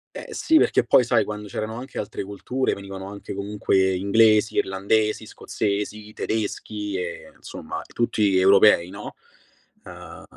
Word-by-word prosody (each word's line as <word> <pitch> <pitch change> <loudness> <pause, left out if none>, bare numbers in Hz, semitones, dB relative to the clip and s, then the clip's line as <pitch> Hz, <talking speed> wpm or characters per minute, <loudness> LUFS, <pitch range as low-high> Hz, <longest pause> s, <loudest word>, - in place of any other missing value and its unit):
Eh - - -8
sì, 320 - +3
perché - - +2
poi 125 - +5
sai, 120 -1 +2
quando 105 -1 -6
c'erano 110 +3 -4
anche 130 +2 -8
altre 105 - -4
culture, 115 +6 -2
venivano 95 -1 -8
anche 100 0 -8
comunque 100 -1 0
inglesi, 110 +3 +3
irlandesi, 105 +3 0
scozzesi, 105 0 -4
tedeschi 105 -2 -3
e 90 -1 -6
insomma - - -7
tutti 105 -4 +1
europei, 95 -2 +5
no. 100 +2 -8 0.7
Ah, - - -11
105 Hz, 135 wpm, -23 LUFS, 100-110 Hz, 0.7 s, poi